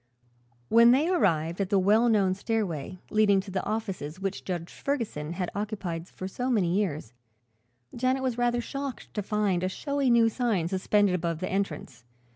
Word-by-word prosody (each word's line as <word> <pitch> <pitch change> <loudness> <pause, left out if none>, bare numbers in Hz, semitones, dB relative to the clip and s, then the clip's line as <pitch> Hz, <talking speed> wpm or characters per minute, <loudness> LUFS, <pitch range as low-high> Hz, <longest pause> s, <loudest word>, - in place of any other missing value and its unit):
When 235 +1 +7
they 270 +6 +4
arrived 170 - +1
at 190 - -1
the 200 - +3
well 215 +5 +4
known 200 -4 +3
stairway 190 -6 -3
leading 210 -2 +4
to 195 0 -10
the 190 0 -2
offices 190 -7 -4
which 195 -1 -3
Judge 175 -2 -4
Ferguson 215 - -3
had 180 0 -3
occupied 200 -5 -4
for 185 - -7
so 250 +6 -3
many 190 -8 +2
years, 155 - -2 0.8
Janet 255 +2 0
was 255 -3 0
rather 240 0 +1
shocked 275 +1 -6
to 210 - -2
find 205 -3 0
a 185 - 0
showy 280 +6 -1
new 235 -1 +5
sign 225 -7 0
suspended 195 +1 +2
above 170 -2 -1
the 185 - -3
entrance. 190 -10 -3
200 Hz, 170 wpm, -27 LUFS, 180-235 Hz, 0.8 s, When